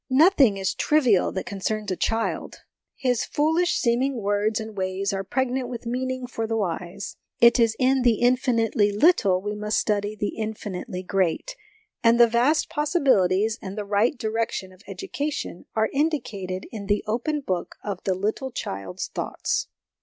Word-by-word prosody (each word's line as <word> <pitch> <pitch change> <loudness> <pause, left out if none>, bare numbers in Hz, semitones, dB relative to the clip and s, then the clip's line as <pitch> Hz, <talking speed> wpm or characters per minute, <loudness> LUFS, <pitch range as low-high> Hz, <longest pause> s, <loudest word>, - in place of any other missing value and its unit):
Nothing 270 - +5
is 190 -1 -1
trivial 255 -11 +3
that 190 - -3
concerns 210 +1 -3
a - - 0
child; 225 +4 -2 0.3
his 250 -3 0
foolish 320 +4 +1
seeming 250 +1 +1
words 205 +2 0
and 220 -1 -7
ways 190 +1 -2
are 195 0 -2
pregnant 255 +3 -1
with 240 -1 -7
meaning 255 +1 -2
for 225 -2 -4
the 225 0 -1
wise. 180 -1 -4 0.2
It 235 +1 +6
is 230 -1 +3
in 265 +1 +3
the 240 -2 +4
infinitely 235 -3 +2
little 205 - +3
we 210 0 -2
must 210 0 -1
study 205 0 0
the 205 0 -2
infinitely 210 -4 -5
great; 195 - -1 0.5
and 230 +1 +5
the 240 - +9
vast 240 +7 +2
possibilities, 255 - +2
and 195 -1 -7
the 210 - -3
right 210 +7 +1
direction 220 -4 -2
of 185 - -19
education, 295 - -4
are 220 0 +1
indicated 215 - -2
in 205 -3 -7
the 205 0 +1
open 245 +8 -1
book 185 -9 -3
of 200 -3 -4
the 190 - 0
little 215 +8 -2
child's 95 - -5
thoughts. - - -2
220 Hz, 160 wpm, -25 LUFS, 200-255 Hz, 0.5 s, the